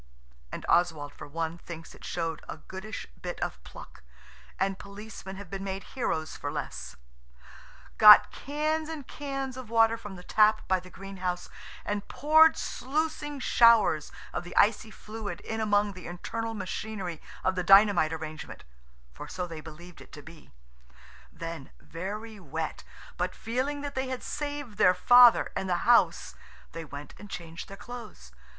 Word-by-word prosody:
(and - - -6
Oswald 160 -5 +2
for - - -10
one 165 +2 -3
thinks 165 -2 -9
it - - -16
showed 165 -2 -3
a - - -5
goodish 190 +3 -7 0.2
bit - - -5
of 60 - -4
pluck, - - -12 0.6
and 195 0 0
policemen 200 -1 -9
have 200 0 -9
been 195 0 -4
made 195 0 -4
heroes 160 -11 -2
for 145 - -4
less) 65 - -5 1.0
got 210 -1 +10
cans 305 +3 -2
and 305 -5 -6
cans 275 -3 -4
of 255 -4 -8
water 225 0 +4
from 205 -4 -9
the 180 - -11
tap 215 +2 +3
by 185 -1 +2
the 185 +1 -13
greenhouse 185 -2 -5 0.4
and 205 0 -3
poured 315 +2 +5
sluicing 295 +1 -2
showers 230 - +5 0.2
of - - -3
the 175 - -9
icy 215 +1 +4
fluid 215 -1 -7
in 220 0 -4
among 205 -1 +2
the 185 -1 -9
internal 225 +6 -4
machinery 190 -3 -5 0.2
of 185 - +2
the 180 - -1
dynamite 195 -4 +6
arrangement–for 60 - -9
so 180 -1 -4
they 165 -3 -8
believed 165 +3 -12
it - - -15
to 145 - -10
be. 165 -1 -14 0.8
Then, 165 - -7
very 210 +5 -6
wet, 160 -2 -5 0.3
but 180 +1 -2
feeling 260 +5 -2
that 285 0 -5
they 265 -1 -2
had 255 -1 -4
saved 290 -7 -5
their 180 0 +6
Father 245 +5 +7
and 190 - -2
the 175 -1 0
house, 240 0 +4 0.4
they 165 - -6
went 145 -1 -9
and 205 +1 -11
changed 170 -2 -7
their 195 - -10
clothes. 140 - -10
195 Hz, 155 wpm, -28 LUFS, 165-230 Hz, 1.0 s, got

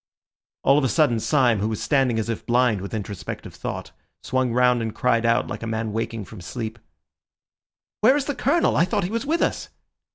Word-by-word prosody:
All 140 +2 +5
of - - -2
a 130 - +2
sudden 120 -1 +3
Syme, 125 -4 +2
who 105 - 0
was 110 - -3
standing 135 -5 +1
as 110 - -1
if 115 -2 -4
blind 120 -4 +2
with 100 - -6
introspective 105 -2 -6
thought, - - -6 0.3
swung 130 -1 0
round 125 0 +3
and 110 -1 -4
cried 115 -2 +2
out, 115 0 +2
like - - -6
a 115 - -4
man 110 -1 -2
waking 115 -1 -3
from 100 0 -11
sleep— 115 +4 -6 1.2
"Where 255 +6 +5
is 280 - -1
the 290 - -1
Colonel? 280 +6 +2
I 165 - +4
thought 195 +2 -1
he 180 - -3
was 230 +4 -2
with 330 +3 +1
us!" - - -2
120 Hz, 205 wpm, -23 LUFS, 110-150 Hz, 1.2 s, All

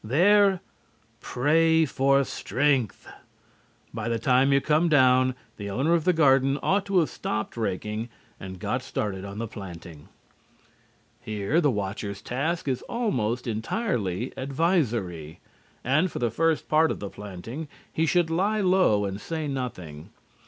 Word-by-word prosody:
There 190 - +4 0.6
pray 160 +6 +2
for 140 0 +2
strength. 130 -2 -1 0.9
By 115 0 -3
the 115 - 0
time 130 +4 +3
you 140 - +5
come 155 +4 +2
down, 130 -3 +4 0.2
the 100 -1 -5
owner 135 +11 +1
of 165 -2 +1
the 180 - +5
garden 135 -4 +3
ought 200 +1 +1
to 195 -1 +1
have 160 - -1
stopped 110 0 -4
raking 105 +1 -3 0.3
and 95 0 -8
got - - -2
started 95 -3 -4
on 100 +1 -8
the 115 +1 -3
planting. 85 -7 -10 1.1
Here 110 - 0
the 150 - +3
watcher's 100 -2 -3
task 150 +6 -2
is 130 -2 -1
almost 125 - -1
entirely 115 - -2
advisory. 120 - -1 0.4
And, 155 +8 +2
for - - -6
the 120 -2 0
first 165 +6 0
part 160 +1 +4
of - - -3
the 100 - -6
planting, 105 - -8 0.3
he 160 +1 +1
should 175 -1 +2
lie 205 +6 +1
low 185 - +3
and 100 +1 -5
say 160 -2 -4
nothing. 90 - -6
130 Hz, 145 wpm, -26 LUFS, 105-160 Hz, 1.1 s, you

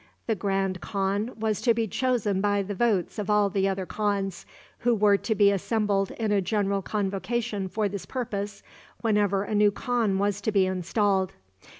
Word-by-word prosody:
The 225 - +1
grand 195 -2 -1
khan 200 +3 -1
was 215 -2 -1
to 235 -3 +3
be 225 -1 0
chosen 215 -4 0
by 205 0 +1
the 205 +1 -4
votes 210 -1 0
of 210 0 -3
all 210 -1 +3
the 195 -1 +1
other 190 -1 -2
khans, 200 -3 -2 0.3
who 240 0 +2
were 210 -1 +4
to 220 +2 -2
be 200 0 +5
assembled 200 -1 0
in 220 -2 -2
a 205 -1 +3
general 200 0 0
convocation 205 +1 -2
for 210 +2 -1
this 195 -2 -6
purpose 205 -5 -4 0.4
whenever 205 -3 +2
a 210 - -4
new 210 0 +5
khan 225 -2 0
was 200 0 0
to 220 - 0
be 195 -2 +3
installed. 190 +1 0
205 Hz, 180 wpm, -26 LUFS, 195-215 Hz, 0.4 s, be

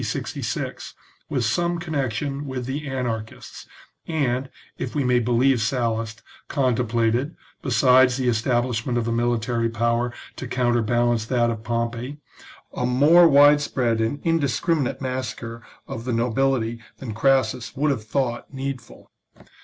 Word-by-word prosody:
66, - - -4 0.3
with 130 -6 0
some 170 +9 0
connection 145 -3 -3
with 130 -2 -4
the 140 +3 -4
anarchists, 115 -4 -5 0.4
and, 135 -5 -1 0.3
if 125 - -4
we 145 - +1
may 125 -1 +3
believe 120 +1 +2
Sallust, 115 -2 -1 0.2
con 130 -4 +1
templated, 120 +5 0 0.3
besides 130 0 +4
the 130 -2 -1
establishment 120 0 0
of 115 -1 -1
a - - 0
military 115 0 0
power 115 +2 0 0.3
to 130 - -5
counterbalance 120 -1 +1
that 120 -2 +2
of 110 -2 -5
Pompey, 115 +3 -3 0.6
a 125 - -1
more 150 +8 +6
widespread 140 -5 +4
and 115 +6 -1
indiscriminate 160 -3 0
massacre 120 -3 -4 0.3
of 115 - -6
the 125 - -1
no 115 +1 0
bility 120 -2 0 0.2
than 120 -5 -6
Crassus 125 -1 +1
would 145 +2 +1
have 120 -6 -2
thought 120 +1 -2
needful. 135 -3 -7
125 Hz, 130 wpm, -23 LUFS, 115-135 Hz, 0.6 s, more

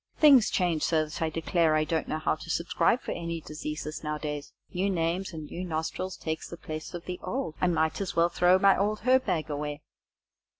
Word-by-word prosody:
Things 275 -8 +7
change 175 -4 +1
so 155 -1 +2
that 155 - -8
I 160 - +1
declare 165 0 +2
I 155 - +3
don't 160 +1 -1
know 155 - -1
how 155 - +1
to 155 - -8
subscribe 170 +7 +1
for - - -4
any 170 -1 -3
diseases 155 0 -6
nowadays. 150 -1 -4 0.2
New 190 +3 +1
names 175 +1 -1
and 155 -3 -7
new 175 +4 -6
nostrils 175 +2 -3
takes 160 0 -4
the 170 - -7
place 155 +1 -6
of 170 - -7
the 180 -1 -5
old, 260 - -3
and 180 -1 +3
I - - +4
might 160 +5 -1
as 195 - -3
well 170 +1 +4
throw 180 +1 +4
my 195 +1 +5
old 210 +2 0
herb 255 +3 +4
bag 155 -2 -1
away." 145 0 -4
165 Hz, 215 wpm, -28 LUFS, 155-185 Hz, 0.2 s, Things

